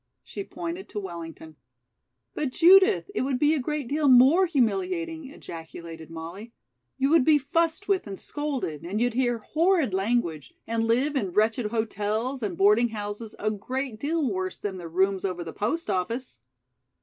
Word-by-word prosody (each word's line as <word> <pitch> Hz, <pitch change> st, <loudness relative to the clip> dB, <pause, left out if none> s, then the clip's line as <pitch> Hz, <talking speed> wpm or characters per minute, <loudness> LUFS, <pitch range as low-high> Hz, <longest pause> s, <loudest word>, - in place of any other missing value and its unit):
She 400 Hz, -, -6 dB
pointed 350 Hz, +1 st, -6 dB
to 210 Hz, -, -4 dB
Wellington. 165 Hz, -4 st, -8 dB, 0.8 s
"But 295 Hz, -, -1 dB
Judith, 385 Hz, +7 st, +5 dB
it -, -, -1 dB
would 260 Hz, 0 st, 0 dB
be 295 Hz, +3 st, +3 dB
a 310 Hz, -, +1 dB
great 295 Hz, 0 st, -3 dB
deal 295 Hz, +3 st, +1 dB
more 270 Hz, +9 st, +6 dB
humiliating," 330 Hz, -, -1 dB
ejaculated 165 Hz, -, -9 dB
Molly. 170 Hz, +8 st, -8 dB, 0.4 s
"You 270 Hz, +2 st, +1 dB
would 325 Hz, -4 st, +6 dB
be 305 Hz, +2 st, +5 dB
fussed 330 Hz, +7 st, 0 dB
with 385 Hz, -, +1 dB
and 195 Hz, -1 st, -7 dB
scolded, 270 Hz, -, -3 dB
and 190 Hz, +5 st, -3 dB
you'd 245 Hz, 0 st, +1 dB
hear 240 Hz, -1 st, +1 dB
horrid 315 Hz, -, +1 dB
language, 190 Hz, -, -1 dB
and 225 Hz, 0 st, -1 dB
live 260 Hz, +6 st, +1 dB
in 195 Hz, -10 st, -1 dB
wretched 220 Hz, +2 st, +2 dB
hotels 220 Hz, +3 st, -2 dB
and 195 Hz, -6 st, -3 dB
boarding 210 Hz, +4 st, +4 dB
houses 210 Hz, 0 st, -6 dB
a 215 Hz, +1 st, -1 dB
great 245 Hz, +3 st, -4 dB
deal 305 Hz, +1 st, 0 dB
worse 185 Hz, -4 st, -3 dB
than 195 Hz, -2 st, -4 dB
the 175 Hz, -2 st, -7 dB
rooms 190 Hz, +3 st, +1 dB
over 180 Hz, -3 st, -2 dB
the 165 Hz, -, -8 dB
post 310 Hz, +11 st, -2 dB
office!" 215 Hz, +6 st, -3 dB
235 Hz, 165 wpm, -26 LUFS, 195-300 Hz, 0.8 s, more